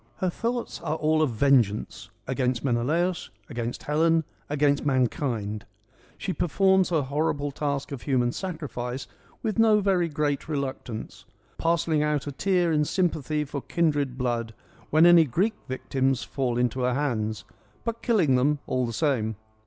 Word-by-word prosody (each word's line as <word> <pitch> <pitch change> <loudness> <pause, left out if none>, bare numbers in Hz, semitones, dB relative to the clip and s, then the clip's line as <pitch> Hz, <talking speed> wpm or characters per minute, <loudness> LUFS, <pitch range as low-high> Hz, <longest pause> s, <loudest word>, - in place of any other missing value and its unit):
Her 185 -1 -1
thoughts 235 +2 -3
are 155 -2 -1
all 155 0 +2
of 155 - +3
vengeance: 115 -3 +1 0.2
against 130 -1 -1
Menelaus, 160 +9 0 0.2
against 120 -1 -4
Helen, 160 +2 +2 0.3
against 145 0 +2
mankind. 120 -6 0 0.5
She 190 - -3
performs 190 +2 +3
her 160 -4 +1
horrible 145 +1 -1
task 140 -1 -3
of 135 -4 -5
human 125 -4 +1
sacrifice 135 -8 -5 0.4
with 220 -1 -1
no 220 -2 +5
very 190 -4 +2
great 145 -1 -1
reluctance; 135 -6 -5 0.2
' - - -36
Parcelling 165 -2 +1
out 150 -1 0
a 145 - -4
tear 180 +3 +1
in 150 -1 +3
sympathy 155 -3 0
for 140 0 -5
kindred 145 -6 0
blood 120 -3 -2 0.2
' - - -27
when 155 +2 +5
any 175 -2 +8
Greek 185 - +1
victims 130 0 -1
fall 125 -3 -2
into 125 +1 0
her 125 -1 +1
hands; 110 -8 -1 0.4
but 230 0 -3
killing 195 - +3
them 145 +4 +2
all 130 -1 0
the 115 - -4
same. 115 -6 0
145 Hz, 155 wpm, -26 LUFS, 125-165 Hz, 0.5 s, any